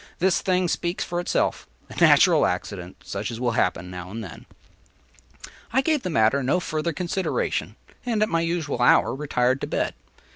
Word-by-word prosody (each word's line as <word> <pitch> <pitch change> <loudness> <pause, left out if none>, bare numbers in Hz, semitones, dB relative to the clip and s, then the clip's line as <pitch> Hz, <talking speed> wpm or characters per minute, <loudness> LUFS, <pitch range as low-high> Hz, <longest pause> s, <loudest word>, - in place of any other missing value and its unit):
This 185 0 +2
thing 185 -1 +1
speaks 170 +1 -2
for 175 -1 -3
itself. 175 - -1 0.2
A - - -12
natural - - +6
accident, 90 -2 -5
such 100 +1 -4
as 115 -1 -6
will 125 -1 0
happen 90 -4 -1
now 90 0 -7
and 110 +3 -6
then!” - - -11 1.2
I 260 +3 +3
gave 305 0 +1
the 185 - -3
matter 135 -2 +3
no 135 +8 +1
further 160 -1 -2
consideration, 180 +3 -2 0.3
and 225 -4 +1
at - - +1
my 165 0 +1
usual 165 -6 -2
hour 120 - +4
retired 130 -2 0
to - - -3
bed. - - -1
155 Hz, 175 wpm, -24 LUFS, 115-180 Hz, 1.2 s, natural